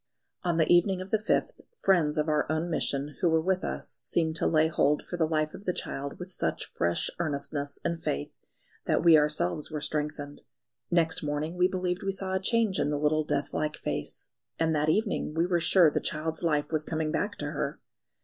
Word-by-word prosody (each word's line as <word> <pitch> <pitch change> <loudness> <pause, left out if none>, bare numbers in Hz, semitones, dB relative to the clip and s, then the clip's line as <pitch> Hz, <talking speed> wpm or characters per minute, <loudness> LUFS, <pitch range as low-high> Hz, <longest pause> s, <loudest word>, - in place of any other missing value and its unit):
On 175 -3 0
the 160 - +4
evening 175 +3 +4
of 185 +1 -7
the 220 - +3
5th, 215 - +1 0.3
friends 170 -6 +2
of 150 +1 +1
our 150 -1 +1
own 160 +2 -1
Mission 145 -2 -1
who 175 - +4
were 160 0 +3
with 185 +3 0
us - - -3
seemed 160 -2 0
to - - +1
lay 160 0 +4
hold 150 -2 +2
for - - -6
the 165 -2 +1
life 155 -1 0
of 200 - -10
the 180 - 0
child 140 +1 -4
with 180 +1 -8
such - - -1
fresh 85 0 -1
earnestness 145 -2 -2
and 170 -1 -1
faith, 70 - -2 0.5
that - - +1
we 170 -2 +8
ourselves 150 - +2
were 155 -1 -3
strengthened. 150 -1 -3 0.5
Next 165 -2 +2
morning 150 +3 -2
we 180 0 +4
believed 180 0 -2
we 195 -1 -1
saw 190 -1 -3
a 190 - +2
change 220 0 +1
in 145 - +1
the 150 - 0
little 150 +1 +2
deathlike 150 +1 -1
face, 75 0 -3 0.3
and 160 -1 +1
that 150 +1 +1
evening 205 -4 0
we 165 +1 +2
were 175 -1 +1
sure 170 -1 +5
the - - 0
child's 160 +1 -2
life 150 -3 0
was 155 -1 +1
coming 155 0 -2
back - - -1
to - - -4
her. - - -3
160 Hz, 205 wpm, -28 LUFS, 150-175 Hz, 0.5 s, we